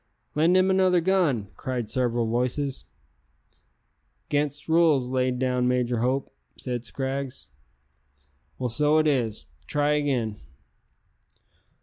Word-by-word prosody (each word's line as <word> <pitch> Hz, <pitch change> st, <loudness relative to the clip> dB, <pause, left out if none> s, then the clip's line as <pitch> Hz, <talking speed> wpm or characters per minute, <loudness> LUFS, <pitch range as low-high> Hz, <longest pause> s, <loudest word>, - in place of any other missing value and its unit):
"Lend 165 Hz, +5 st, +3 dB
him 185 Hz, +1 st, +3 dB
another 185 Hz, -1 st, +4 dB
gun," 165 Hz, -, +1 dB
cried 125 Hz, -4 st, -3 dB
several 120 Hz, -1 st, 0 dB
voices. 125 Hz, +4 st, -1 dB, 1.4 s
"'Gainst 145 Hz, 0 st, -1 dB
rules 160 Hz, -5 st, +4 dB
laid 125 Hz, 0 st, 0 dB
down 125 Hz, -1 st, 0 dB
by 125 Hz, 0 st, +2 dB
Major 125 Hz, -1 st, 0 dB
Hope," 130 Hz, +3 st, -1 dB, 0.2 s
said 125 Hz, -2 st, -4 dB
Scraggs. 135 Hz, +1 st, -4 dB, 1.1 s
"Well, 130 Hz, -, -2 dB
so 150 Hz, +5 st, +3 dB
it 155 Hz, -, +3 dB
is; 120 Hz, -8 st, 0 dB, 0.2 s
try 145 Hz, 0 st, +1 dB
again." 130 Hz, -8 st, 0 dB
130 Hz, 110 wpm, -25 LUFS, 125-150 Hz, 1.4 s, another